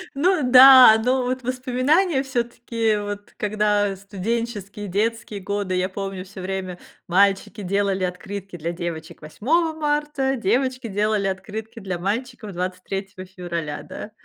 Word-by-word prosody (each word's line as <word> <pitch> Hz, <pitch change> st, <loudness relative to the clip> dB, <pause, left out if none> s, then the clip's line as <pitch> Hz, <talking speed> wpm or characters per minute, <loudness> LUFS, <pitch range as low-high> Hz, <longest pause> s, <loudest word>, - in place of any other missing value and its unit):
Ну 355 Hz, +4 st, +2 dB
да, 255 Hz, -3 st, +10 dB
но 255 Hz, +1 st, +2 dB
вот 255 Hz, +1 st, -2 dB
воспоминания 260 Hz, +6 st, +1 dB
всё-таки, 235 Hz, -3 st, -1 dB
вот 205 Hz, 0 st, -6 dB
когда, 210 Hz, 0 st, +1 dB
э, 195 Hz, -, -4 dB
студенческие, 205 Hz, +1 st, -4 dB
детские 215 Hz, +2 st, -2 dB
годы, 200 Hz, -1 st, -2 dB
я 180 Hz, 0 st, +1 dB
помню, 195 Hz, -1 st, -5 dB
всё 195 Hz, 0 st, -10 dB
время 185 Hz, -1 st, -4 dB, 0.3 s
мальчики 195 Hz, +3 st, +2 dB
делали 195 Hz, 0 st, 0 dB
открытки 190 Hz, +1 st, -6 dB
для 165 Hz, +1 st, -3 dB
девочек 170 Hz, -2 st, -6 dB
8 315 Hz, -, 0 dB
марта, 295 Hz, -3 st, -1 dB
девочки 255 Hz, +3 st, 0 dB
делали 210 Hz, 0 st, 0 dB
открытки 215 Hz, +4 st, -5 dB
для 185 Hz, -4 st, -4 dB
мальчиков 220 Hz, +2 st, -3 dB
23 185 Hz, +2 st, -5 dB
февраля, 170 Hz, -5 st, -5 dB
да. 215 Hz, -, -8 dB
205 Hz, 130 wpm, -23 LUFS, 190-250 Hz, 0.3 s, да